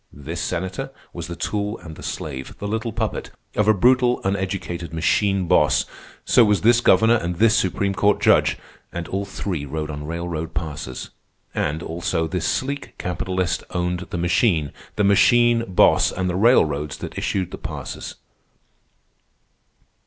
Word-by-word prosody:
This 75 +5 -6
senator 95 +10 -3 0.2
was 85 -1 -6
the 85 - -6
tool 105 +4 -2
and 80 -2 -10
the - - -12
slave, 65 -3 -6
the 100 - -5
little 110 +2 -2
puppet, - - -3 0.3
of 105 - +2
a 110 - +7
brutal 125 +4 +4
uneducated 95 -3 -3
machine 95 +3 +1
boss; - - +3 0.4
so 120 - +6
was 105 -2 +2
this 120 +2 +5
governor 110 +3 +5
and 90 -4 -3
this 110 +4 +4
supreme 100 +2 +1
court 100 +1 +2
judge; - - +4 0.3
and 85 -1 -5
all 100 +1 -2
three 95 -5 -4
rode 75 +2 -4
on 75 0 -6
railroad 85 0 -4
passes; 75 -5 -5 0.4
and, 80 +3 -1
also, 80 0 -1
this 80 +1 -2
sleek 140 +2 -2
capitalist 90 0 -2
owned 90 +1 -2
the - - -3
machine, 85 - +2 0.2
the 105 - +1
machine 120 +4 +5
boss, 90 - +4
and 95 0 -2
the 90 - -1
railroads 75 - +3
that - - -7
issued 95 -3 -2
the - - -7
passes. - - -6
90 Hz, 150 wpm, -22 LUFS, 80-105 Hz, 0.4 s, a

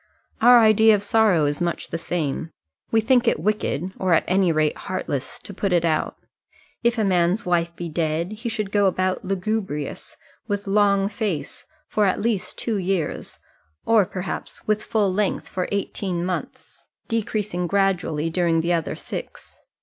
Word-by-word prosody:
Our 245 +2 +8
idea 220 0 +6
of 205 - -3
sorrow 205 -7 +3
is 145 +3 -1
much 170 -1 -2
the - - -3
same. 165 -2 -2 0.4
We 225 - +3
think 245 +2 +3
it 230 - +2
wicked, 190 -2 -1
or 185 -3 +3
at - - +2
any 185 -1 +3
rate 155 -1 +1
heartless, 140 -8 -4
to 200 - -10
put 195 0 -2
it 170 -1 +3
out. 160 -2 0 0.7
If 235 0 +2
a 220 - +2
man's 180 +2 +2
wife 170 -1 0
be 175 - -5
dead, 165 +2 -1
he 225 +3 -5
should 215 -3 -3
go 205 -1 +3
about 185 0 0
lugubrious, 190 -6 -3 0.3
with 205 0 -2
long 200 -1 +3
face, 200 -6 -4 0.2
for 210 -2 +2
at 185 - 0
least 220 -3 -2
two 225 -3 -1
years, 185 -3 -2 0.5
or 220 -5 +4
perhaps 185 0 -6
with 215 0 +1
full 205 -4 +1
length 205 0 -1
for 180 -1 -3
eighteen 190 -3 -2
months, 185 0 -5 0.2
decreasing 210 -5 -2
gradually 175 -5 0
during 165 -1 +2
the 170 +2 +1
other 165 -3 -1
six. - - -8
190 Hz, 165 wpm, -23 LUFS, 170-210 Hz, 0.7 s, Our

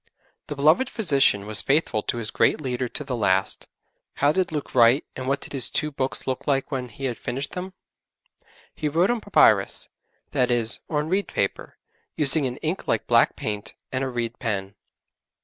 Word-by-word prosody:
The 145 - -4
beloved 155 - +3
physician 140 - +2
was 110 0 +1
faithful 135 -6 +1
to 120 - -2
his 115 -2 -2
great - - +2
leader 125 -3 -2
to 150 - -4
the 135 -3 -3
last. 95 -4 0 0.5
How 145 +1 +3
did 185 +1 0
Luke 150 -2 -4
write, 120 +3 +5
and 130 0 -5
what 140 +1 0
did - - -9
his 135 -4 +2
two 150 - -1
books 135 -2 -3
look 130 -1 -3
like 135 -1 0
when 130 -3 -3
he 135 +5 -7
had 125 -3 -3
finished 130 +4 -4
them? 185 +1 -6 1.0
He 150 - -2
wrote 170 +8 +2
on 240 -2 -1
papyrus - - +3 0.4
that 125 -3 +1
is, 120 -2 +2
on 150 -1 -1
reed 195 +4 0
paper, - - -3 0.4
using 145 -1 +1
an 125 0 -5
ink 160 +5 -2
like - - 0
black 120 0 +4
paint, 105 -1 -4 0.2
and 130 +1 -1
a 135 - -1
reed 120 -2 -4
pen. 100 -4 -3
135 Hz, 185 wpm, -24 LUFS, 120-150 Hz, 1.0 s, write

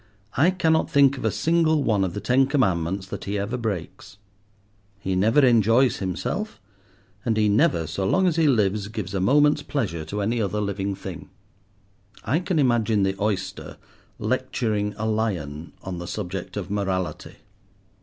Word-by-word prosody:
I 155 +7 +4
cannot 160 -3 +1
think 140 -1 +4
of - - -5
a - - +3
single 160 -2 +2
one 105 -6 +2
of 90 -2 -2
the - - -2
Ten 125 +6 +3
Commandments 95 - 0
that - - -6
he 100 +1 -2
ever 100 +5 -2
breaks. 105 -5 -5 0.8
He 95 -1 -2
never 115 +9 +4
enjoys 120 +1 +4
himself, 100 - -3 0.6
and 115 -4 0
he 105 -1 +3
never, 95 -5 +2
so 85 +5 -3
long 190 - +2
as 175 -3 +2
he 165 -2 +3
lives, 105 -5 +1
gives 105 -3 -5
a 95 - -1
moment's 145 +8 +4
pleasure 95 - -3
to 105 +6 -4
any 115 +3 0
other 105 0 -1
living 100 -1 -2
thing. - - -8 0.9
I 135 +9 +1
can 180 -1 -2
imagine 115 -6 +2
the 95 0 0
oyster 100 -3 -3 0.4
lecturing 105 -3 -1
a 110 - -3
lion 90 -9 -2
on 90 -2 -5
the 85 - -6
subject 95 -1 -5
of 100 -1 -5
morality. 95 -3 -2
105 Hz, 165 wpm, -24 LUFS, 95-130 Hz, 0.9 s, I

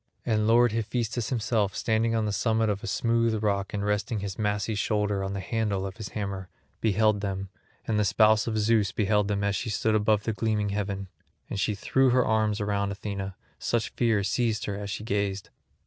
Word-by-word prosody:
And 110 -2 +1
lord 120 +1 +5
Hephaestus 115 +1 -2
himself 110 -4 0
standing 115 +1 +1
on 110 -1 +1
the 105 - -1
summit 110 +1 +1
of 100 -1 -2
a - - -4
smooth 115 -2 +1
rock 100 -2 0
and 100 -1 -2
resting 105 +2 0
his 100 -1 -5
massy 105 +1 0
shoulder 105 -1 0
on 95 0 -3
the 100 - -3
handle 105 -2 -1
of 95 +1 -6
his 110 -3 -6
hammer, 100 -3 -4 0.3
beheld 110 -1 +2
them, 95 -1 -3 0.4
and 110 -2 +1
the - - +3
spouse 110 +1 +4
of 110 -1 -1
Zeus 110 -2 +2
beheld 105 -1 +1
them 100 -1 -1
as 100 0 +1
she 115 - -3
stood 110 +1 +1
above 105 -1 +2
the 110 - -1
gleaming 105 -1 0
heaven; 100 -1 -3 0.4
and 100 - -2
she 105 +2 0
threw 130 +6 +2
her 125 0 +3
arms 110 -1 +1
round 100 -1 0
Athena, 100 -1 -5 0.2
such 115 -2 0
fear 115 -4 +1
seized 110 +2 0
her 100 - -3
as 100 0 -5
she 105 - -4
gazed. 100 -2 -2
105 Hz, 200 wpm, -27 LUFS, 100-110 Hz, 0.4 s, lord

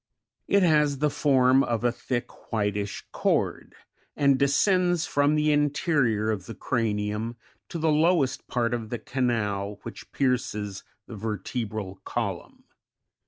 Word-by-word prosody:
It 200 -1 +4
has 150 -4 +3
the 150 +2 +1
form 135 -2 +4
of 115 -1 -1
a 120 - +3
thick, 120 0 -5
whitish 105 -2 -2
cord, - - -1 0.4
and 140 -2 +3
descends 175 +4 +3
from 145 +1 +2
the 150 0 +2
interior 145 - +1
of 95 -3 -4
the 115 - -7
cranium 110 -1 -1 0.3
to - - -4
the 160 -1 +2
lowest 155 -2 +2
part 120 -1 0
of 115 -3 -3
the 120 - -2
canal 105 -6 -1
which 115 - -9
pierces 105 -7 -1 0.2
the 115 - -9
vertebral 105 -2 -4
column. - - -4
125 Hz, 130 wpm, -26 LUFS, 110-145 Hz, 0.4 s, It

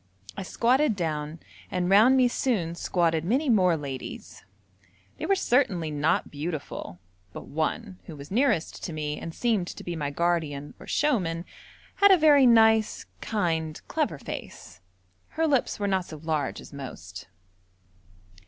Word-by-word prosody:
I 200 - -5
squatted 245 +6 +2
down, 155 -3 -3 0.3
and 180 -1 -1
round 220 +8 +6
me 255 -1 +5
soon 215 -9 -1
squatted 170 -2 0
many 260 - +1
more 180 -6 +4
ladies 135 -3 -7 0.7
they - - -4
were 395 - +4
certainly 200 - +1
not 150 +3 0
beautiful, 145 - -5 0.4
but - - -8
one, 185 +6 -3
who 160 - -9
was 145 +2 -11
nearest 225 - 0
to 170 - -5
me 150 -1 -3
and 165 - -6
seemed 215 -2 0
to - - -8
be 175 - -4
my 145 -3 -2
guardian 150 -2 -1
or - - -12
showman, 180 - 0 0.5
had 400 - +6
a 380 - +7
very 290 -5 +6
nice, 220 -2 +4 0.2
kind, 165 -7 -1
clever - - -1
face. 85 - -9 0.6
Her 325 - +2
lips 275 -8 +1
were 205 - -1
not 190 -2 0
so 155 - -9
large 155 -2 -2
as - - -13
most. 100 -9 -9
175 Hz, 150 wpm, -26 LUFS, 155-230 Hz, 0.7 s, a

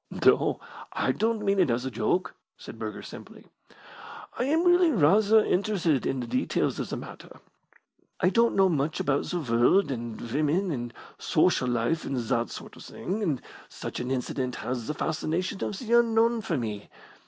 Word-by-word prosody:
"No, - - +4 0.3
I - - +1
don't 225 -1 -1
mean 195 0 +2
it 175 -7 +4
as 120 +2 0
a 130 - -3
joke," 115 +11 0 0.2
said - - -11
Burger, - - -5
simply. - - -11 0.9
"I 245 - -1
am 320 +5 +2
really 350 -1 +5
rather 210 - +4
interested 180 - +1
in 135 - -1
the - - -4
details 125 +2 -1
of - - -3
the - - -3
matter. - - -11 0.8
I 180 - +3
don't 230 +3 +3
know 195 -1 +5
much 155 -3 -1
about 140 0 0
the 175 - -2
world 135 +6 +3
and 120 -3 -5
women 155 +10 0
and 120 -4 -4 0.3
social 125 - +2
life 120 +7 0
and 135 - -3
that 115 0 -1
sort - - -9
of - - -12
thing, 200 +4 -4
and 155 -11 -1 0.3
such - - -6
an 125 - -4
incident 130 0 -2
has 125 -2 -4
the 150 - -3
fascination 165 +5 -2
of 200 - -3
the 235 0 -3
unknown 230 0 +2
for 170 -6 -2
me. 105 -4 -5
155 Hz, 175 wpm, -27 LUFS, 125-205 Hz, 0.9 s, really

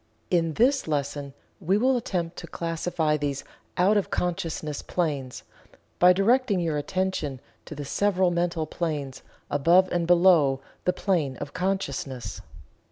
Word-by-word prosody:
In 165 -3 +2
this 265 +1 +2
lesson 145 -2 -3 0.2
we 190 +2 +1
will 255 +4 +3
attempt 180 -8 -2
to 170 - -7
classify 165 -2 -1
these 140 -2 -3 0.3
out 195 +4 +4
of 200 - 0
consciousness 165 -4 -2
planes, 145 -8 -3 0.6
by 180 +1 +7
directing 210 +2 +3
your 165 -3 -1
attention 150 -3 -2 0.3
to 155 - -8
the 145 0 -6
several 190 +3 +1
mental 170 -2 0
planes 150 -5 -4 0.3
above 170 +6 +4
and 170 -1 0
below 170 -6 +5 0.3
the 180 - +2
plane 165 -9 0
of 145 - -7
consciousness. 140 - -3
170 Hz, 135 wpm, -26 LUFS, 145-185 Hz, 0.6 s, by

